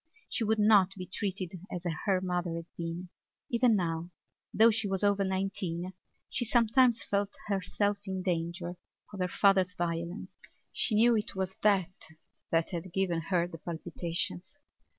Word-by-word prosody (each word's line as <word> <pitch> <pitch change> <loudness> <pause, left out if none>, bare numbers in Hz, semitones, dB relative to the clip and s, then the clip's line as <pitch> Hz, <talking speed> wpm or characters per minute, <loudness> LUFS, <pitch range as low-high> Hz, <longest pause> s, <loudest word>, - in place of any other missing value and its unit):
She 230 - -1
would 220 0 +2
not 205 -3 +5
be 185 -2 -6
treated 185 -1 -3
as 180 -1 -4 0.2
her 190 -2 +3
mother 180 -2 -1
had 165 0 -5
been. 170 +1 -5 0.4
Even 235 -1 +4
now, 170 -2 -1 0.4
though 225 +2 +6
she 215 -1 0
was 195 0 0
over 200 -1 +3
nineteen, 190 -2 -2 0.3
she 245 - -1
sometimes 235 +1 +4
felt 200 0 -1
herself 200 0 0
in 190 -1 -3
danger 175 0 -2 0.4
of 200 - -7
her 180 - +1
father's 190 -1 +3
violence. 170 +2 -3 0.4
She 220 - +1
knew 235 +2 +5
it 215 -1 -2
was 190 0 -2
that 195 -4 +3 0.6
that 165 0 +1
had 175 0 -5
given 180 -3 0
her 175 -3 +3
the 165 -2 -9
palpitations. 175 - -3
190 Hz, 150 wpm, -30 LUFS, 175-205 Hz, 0.6 s, though